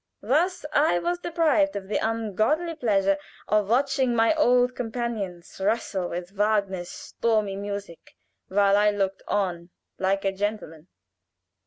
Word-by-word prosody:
Thus 310 Hz, -, +1 dB
I 290 Hz, -, +3 dB
was 350 Hz, -, -1 dB
deprived 320 Hz, -4 st, +1 dB
of 195 Hz, -1 st, -5 dB
the 210 Hz, -, 0 dB
ungodly 225 Hz, -, 0 dB
pleasure 195 Hz, -8 st, +1 dB, 0.3 s
of 210 Hz, -1 st, +1 dB
watching 260 Hz, 0 st, +2 dB
my 225 Hz, +5 st, +4 dB
old 250 Hz, -5 st, +3 dB
companions 220 Hz, -8 st, -4 dB
wrestle 195 Hz, -3 st, 0 dB
with 175 Hz, +1 st, -5 dB
Wagner's 200 Hz, -3 st, 0 dB
stormy 215 Hz, -4 st, -1 dB
music 200 Hz, -3 st, -7 dB, 0.3 s
while 200 Hz, +1 st, +3 dB
I 210 Hz, 0 st, +4 dB
looked 195 Hz, -2 st, -1 dB
on 180 Hz, -4 st, -1 dB, 0.3 s
like 195 Hz, +1 st, 0 dB
a 195 Hz, -, +2 dB
gentleman." 195 Hz, -5 st, -4 dB
210 Hz, 130 wpm, -25 LUFS, 195-245 Hz, 0.3 s, my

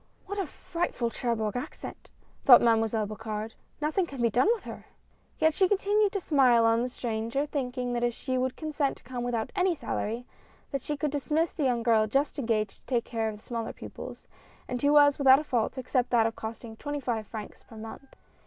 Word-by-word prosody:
"What 405 Hz, +1 st, -4 dB
a 385 Hz, -, -1 dB
frightful 290 Hz, -8 st, -3 dB
Cherbourg 225 Hz, -4 st, -1 dB
accent!" 245 Hz, -, -7 dB, 0.3 s
thought 250 Hz, -3 st, +10 dB
Mademoiselle 225 Hz, -2 st, +2 dB
Bocard; 215 Hz, +1 st, -5 dB, 0.3 s
"Nothing 310 Hz, +5 st, 0 dB
can 275 Hz, -4 st, -9 dB
be 235 Hz, -1 st, +2 dB
done 250 Hz, -, +3 dB
with 450 Hz, -, -12 dB
her! -, -, -9 dB, 0.3 s
" -, -, -37 dB
Yet 315 Hz, 0 st, +3 dB
she 380 Hz, +3 st, +3 dB
continued 410 Hz, +1 st, +2 dB
to 400 Hz, -, 0 dB
smile 255 Hz, -9 st, +4 dB
on 225 Hz, +1 st, +4 dB
the 250 Hz, -, -1 dB
stranger, 230 Hz, +3 st, -2 dB
thinking 250 Hz, -4 st, -3 dB
that 240 Hz, 0 st, -1 dB
if 240 Hz, -1 st, +1 dB
she 260 Hz, -1 st, -3 dB
would 255 Hz, 0 st, 0 dB
consent 300 Hz, -2 st, -1 dB
to -, -, -19 dB
conie 250 Hz, 0 st, -5 dB
without 235 Hz, -2 st, -2 dB
any 365 Hz, -2 st, +2 dB
salary, 235 Hz, -4 st, -3 dB, 0.5 s
that 275 Hz, -, -2 dB
she 295 Hz, +3 st, -3 dB
could 295 Hz, 0 st, -1 dB
dismiss 300 Hz, +3 st, 0 dB
the 295 Hz, -, -1 dB
young 240 Hz, -3 st, +1 dB
girl 220 Hz, -2 st, +4 dB
just 275 Hz, +6 st, 0 dB
engaged 220 Hz, -5 st, 0 dB
to -, -, -37 dB
take 240 Hz, -3 st, 0 dB
care 225 Hz, -2 st, -1 dB
of 210 Hz, -, -7 dB
the 210 Hz, -, -20 dB
smaller 230 Hz, -2 st, -4 dB
pupils, -, -, -9 dB, 0.4 s
and 250 Hz, -1 st, -3 dB
who 290 Hz, +1 st, +4 dB
was 290 Hz, -1 st, +6 dB
without 265 Hz, -1 st, +8 dB
a 300 Hz, -, -2 dB
fault, 250 Hz, -3 st, -1 dB
except 255 Hz, -1 st, 0 dB
that 235 Hz, -2 st, +4 dB
of 225 Hz, 0 st, -1 dB
costing 225 Hz, 0 st, -7 dB
twenty 290 Hz, +5 st, -4 dB
five 230 Hz, -5 st, -2 dB
francs 215 Hz, -2 st, -8 dB
per 225 Hz, -, -14 dB
month. 225 Hz, +5 st, -10 dB
250 Hz, 210 wpm, -28 LUFS, 225-290 Hz, 0.5 s, thought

